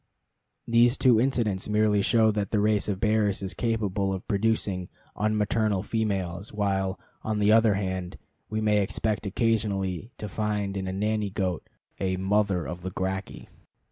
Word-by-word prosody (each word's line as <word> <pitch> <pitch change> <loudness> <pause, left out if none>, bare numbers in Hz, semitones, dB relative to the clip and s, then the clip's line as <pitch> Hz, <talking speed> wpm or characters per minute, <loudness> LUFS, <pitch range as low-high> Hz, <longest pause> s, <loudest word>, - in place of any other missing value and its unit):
These 120 +2 +4
two 125 -4 +5
incidents 115 -7 0
merely 105 -1 +3
show 110 +1 +4
that 105 -1 -2
the 105 - +1
race 105 0 +1
of 95 -2 -2
bears 105 -2 +1
is 95 - -3
capable 105 -4 -1
of 95 -1 -5
producing 100 -3 0 0.3
unmaternal 105 -1 0
females, 100 -4 -2
while, 95 -2 -1 0.2
on 110 -1 -2
the 105 0 +3
other 110 -2 +5
hand, 95 -2 -3 0.3
we 110 0 -2
may 105 -1 +3
expect 105 +1 -1
occasionally 105 -2 -1
to 105 - -5
find 105 0 -2
in 95 -1 -3
a - - -2
nanny 105 +1 -1
goat 95 -4 -3 0.3
a 95 -1 0
Mother 95 -2 +1
of 90 0 -6
the 95 - -4
Gracchi. 95 +1 -4
105 Hz, 155 wpm, -27 LUFS, 95-110 Hz, 0.3 s, two